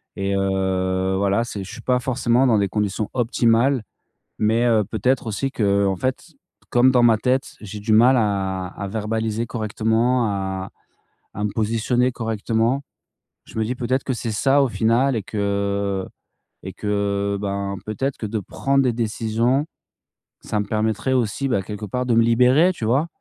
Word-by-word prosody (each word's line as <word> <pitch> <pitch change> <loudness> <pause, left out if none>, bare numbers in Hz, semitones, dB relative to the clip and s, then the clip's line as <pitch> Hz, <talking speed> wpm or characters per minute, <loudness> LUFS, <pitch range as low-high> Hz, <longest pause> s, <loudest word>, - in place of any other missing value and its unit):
Et 100 -1 -1
heu, 95 -1 0
voilà, 100 +3 +1
c'est 105 -4 -6
je 95 - -9
suis - - -9
pas 125 -1 +1
forcément 125 0 +1
dans 115 -4 +4
des 100 - +1
conditions 105 +1 -2
optimales. 120 +1 +2 0.6
Mais, 110 +3 +2
heu, 110 -3 +3
peut-être 115 +5 -1
aussi 110 +6 -2
qu'en 100 -4 +1
fait, 130 +8 -2 0.4
comme 125 +2 +4
dans 125 -2 +4
ma 115 -2 +5
tête, 130 +4 -1
j'ai 105 0 -7
du 110 +1 0
mal 125 +4 +6
à 95 -4 -1
à 100 +2 -7
verbaliser 110 +2 -2
correctement, 115 +2 0
à 95 -2 -3 0.6
à 105 - -3
me 105 - -1
positionner 115 +3 +1
correctement. 115 +2 -1 0.6
Je - - -9
me 110 - +1
dis: 120 +4 -2
«Peut-être 125 +1 -1
que 130 - -1
c'est 115 -1 -4
ça 135 +6 +3
au 135 - +2
final 120 +4 +2
et 110 - -1
que 100 -1 -1 0.6
et - - -7
que 100 -1 -1
ben, 100 0 -3
peut-être 135 +6 -2
que - - -5
de 110 +1 -2
prendre 135 +7 0
des 125 -3 +1
décisions, 115 +4 0 0.8
ça 105 - -2
me 105 - -1
permettrait 110 +4 -1
aussi, 130 +2 0
bah, 110 -7 +1
quelque 105 +2 -6
part 125 +6 -2
de 125 - +1
me 115 - +5
libérer», 125 +9 +4
tu 120 - -5
vois? 135 +8 +2
110 Hz, 170 wpm, -22 LUFS, 100-125 Hz, 0.8 s, mal